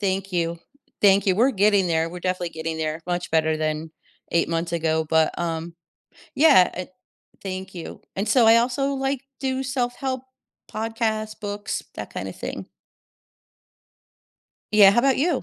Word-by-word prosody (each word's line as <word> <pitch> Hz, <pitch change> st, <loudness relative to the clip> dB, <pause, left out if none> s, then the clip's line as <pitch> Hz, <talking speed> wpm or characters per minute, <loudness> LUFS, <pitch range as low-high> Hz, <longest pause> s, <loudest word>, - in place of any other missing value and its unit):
Thank 195 Hz, -1 st, -1 dB
you, 170 Hz, -1 st, -1 dB, 0.4 s
thank 200 Hz, -1 st, +5 dB
you. 190 Hz, -, +4 dB
We're 245 Hz, +6 st, +4 dB
getting 200 Hz, -3 st, +3 dB
there, 165 Hz, -1 st, +1 dB
we're 180 Hz, +1 st, -8 dB
definitely 180 Hz, -1 st, -2 dB
getting 160 Hz, 0 st, -4 dB
there, 155 Hz, 0 st, -2 dB
much 175 Hz, -1 st, -2 dB
better 160 Hz, -1 st, +2 dB
than 155 Hz, +1 st, -2 dB, 0.4 s
8 170 Hz, -, +2 dB
months 165 Hz, +1 st, -2 dB
ago, 160 Hz, -1 st, 0 dB
but 160 Hz, 0 st, +2 dB
um 165 Hz, 0 st, -3 dB, 0.6 s
yeah, 280 Hz, -, +6 dB
uh, 185 Hz, -, -3 dB, 0.6 s
thank 190 Hz, 0 st, -6 dB
you, 170 Hz, -, -8 dB, 0.2 s
and 200 Hz, +3 st, -1 dB
so 245 Hz, -4 st, +5 dB
I 225 Hz, +1 st, +8 dB
also, 265 Hz, +4 st, +1 dB
like, 270 Hz, -1 st, -1 dB, 0.2 s
do 265 Hz, -1 st, -1 dB
self-help 260 Hz, 0 st, -2 dB, 0.5 s
podcast, 220 Hz, -1 st, -2 dB
books, 205 Hz, -1 st, -4 dB
that -, -, -7 dB
kinda -, -, -5 dB
thing. -, -, -7 dB, 2.1 s
Yeah, 200 Hz, -2 st, +9 dB
how 240 Hz, +4 st, +3 dB
'bout 270 Hz, -1 st, +3 dB
you? 305 Hz, 0 st, +1 dB
195 Hz, 150 wpm, -23 LUFS, 165-240 Hz, 2.1 s, Yeah